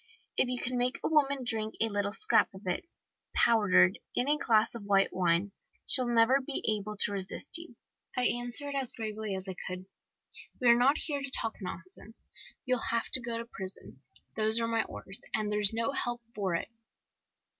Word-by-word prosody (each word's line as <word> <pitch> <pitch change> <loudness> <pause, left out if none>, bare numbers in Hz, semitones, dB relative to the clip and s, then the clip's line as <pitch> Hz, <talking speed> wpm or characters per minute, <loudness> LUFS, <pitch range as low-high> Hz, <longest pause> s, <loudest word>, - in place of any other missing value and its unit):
If 250 - +2
you 250 - -1
can 250 0 -2
make 250 +1 +1
a - - +1
woman 280 -4 +2
drink 220 -2 -1
a 225 - +3
little 205 -1 -1
scrap 205 - +3
of 190 - -12
it, 180 -1 -1 0.5
powdered, 210 -4 +4 0.2
in 250 - +1
a 295 - +4
glass 220 -3 +3
of 235 - -6
white 195 -1 +3
wine, 180 +2 +1 0.3
she'll 255 -2 +1
never 240 +3 +4
be 270 +1 -4
able 210 0 -6
to 205 - +3
resist 200 - -1
you. 335 -8 -12 0.4
I 250 - +2
answered, 245 +5 -2
as 270 -3 -2
gravely 215 -3 -4
as 190 0 -4
I 190 - -3
could: 185 0 -5 0.7
"'We 245 - +4
are 235 - +8
not 260 +5 +4
here 290 -3 -3
to 275 - -4
talk 225 -3 -1
nonsense. 185 +4 -8 0.4
You'll 255 -3 0
have 230 0 0
to 260 - +3
go 235 -1 -3
to 230 - -5
prison. 190 - -8 0.3
Those 220 +1 +3
are 230 - 0
my 230 -1 +1
orders, 195 +1 -5
and 215 -1 -1
there's 210 -1 +4
no 230 +3 0
help 240 -3 -2
for 190 -4 -1
it! 170 - -3
225 Hz, 190 wpm, -30 LUFS, 200-250 Hz, 0.7 s, are